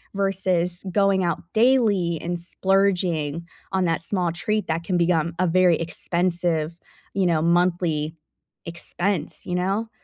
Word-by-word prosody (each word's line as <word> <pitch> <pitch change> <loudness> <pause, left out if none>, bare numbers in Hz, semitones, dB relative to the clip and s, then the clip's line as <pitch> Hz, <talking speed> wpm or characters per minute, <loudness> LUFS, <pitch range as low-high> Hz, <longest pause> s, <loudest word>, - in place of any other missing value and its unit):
versus 185 -3 0
going 195 -1 +3
out 170 -3 -1
daily 215 -8 +3
and 175 0 -2
splurging 175 -4 0 0.3
on 190 -1 +1
that 165 0 0
small 175 -1 -1
treat 210 +5 -1
that 165 +1 -1
can 180 0 0
become 170 -1 +1
a 185 - +2
very 180 -1 +4
expensive, 170 -1 -1 0.4
you 195 -2 +1
know, 160 -2 +2
monthly 170 -3 +1 0.5
expense, 170 -1 -3
you 180 - -4
know? 195 +5 -1
175 Hz, 130 wpm, -23 LUFS, 170-190 Hz, 0.5 s, very